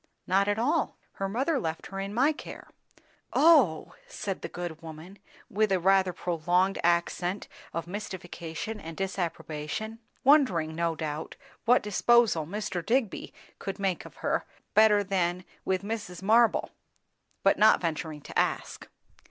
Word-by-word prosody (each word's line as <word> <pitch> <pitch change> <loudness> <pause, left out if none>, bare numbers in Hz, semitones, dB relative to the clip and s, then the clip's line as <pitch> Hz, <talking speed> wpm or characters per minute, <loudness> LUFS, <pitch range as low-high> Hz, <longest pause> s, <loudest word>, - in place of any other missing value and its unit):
"Not 195 +2 +2
at 205 +1 +1
all. 285 +6 0
Her 195 0 -3
mother 270 +8 0
left 160 -1 -4
her 195 - -6
in 195 +1 -3
my 260 +8 +3
care." 305 - -9 0.6
"Oh! 280 - +5
" - - -30
said 195 -2 -4
the - - -5
good 175 -2 -6
woman, 165 +4 -10 0.3
with 215 0 +1
a 190 - +3
rather 190 +1 +4
prolonged 180 +2 0
accent 175 +2 0 0.2
of 165 -1 -3
mystification 180 0 -6
and 165 -2 -8
disapprobation; 190 +2 -4 0.2
wondering, 225 - +4
no 165 0 0
doubt, 155 0 -5 0.3
what 245 +2 +5
disposal 210 -5 +3
Mr. 190 -2 -3
Digby 235 +1 0 0.3
could 195 - -5
make 195 -3 -1
of - - -13
her, - - +1 0.3
better 210 -1 +6
than 180 -2 -1 0.2
with 190 0 0
Mrs. 205 -4 -5
Marble; 225 +3 +4 0.7
but - - +4
not 215 +1 +6
venturing 160 -2 -3
to - - -11
ask. - - -2
190 Hz, 145 wpm, -28 LUFS, 170-215 Hz, 0.7 s, better